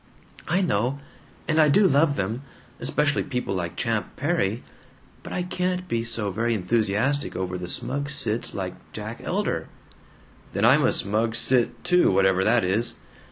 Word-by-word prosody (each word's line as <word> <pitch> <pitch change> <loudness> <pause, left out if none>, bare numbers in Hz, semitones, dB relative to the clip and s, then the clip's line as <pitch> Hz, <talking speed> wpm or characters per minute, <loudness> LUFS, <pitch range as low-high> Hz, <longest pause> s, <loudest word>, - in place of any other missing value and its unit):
"I 180 +5 +2
know. 130 - 0 0.5
And 160 0 +3
I 150 - +5
do 200 +8 +5
love 145 -1 +3
them. 110 +5 -2 0.4
Especially 150 -1 +1
people 125 -7 -3
like 85 -2 -3
Champ 115 0 -2
Perry. 130 - 0 0.6
But - - -9
I 180 - -1
can't 180 0 -2
be 115 -7 -1
so 115 -3 -2
very 115 +4 0
enthusiastic 110 +7 0
over 90 0 -3
the 90 -1 -5
smug 140 +9 -2
cits 120 -5 -1
like 95 -2 -3 0.2
Jack - - -6
Elder." - - -1 0.9
"Then - - +1
I'm - - +6
a - - +4
smug 110 +3 +1
cit, 125 -1 +1
too, 180 0 +4
whatever 95 0 +3
that 115 +3 +3
is." 100 +6 +1
115 Hz, 160 wpm, -25 LUFS, 100-145 Hz, 0.9 s, I'm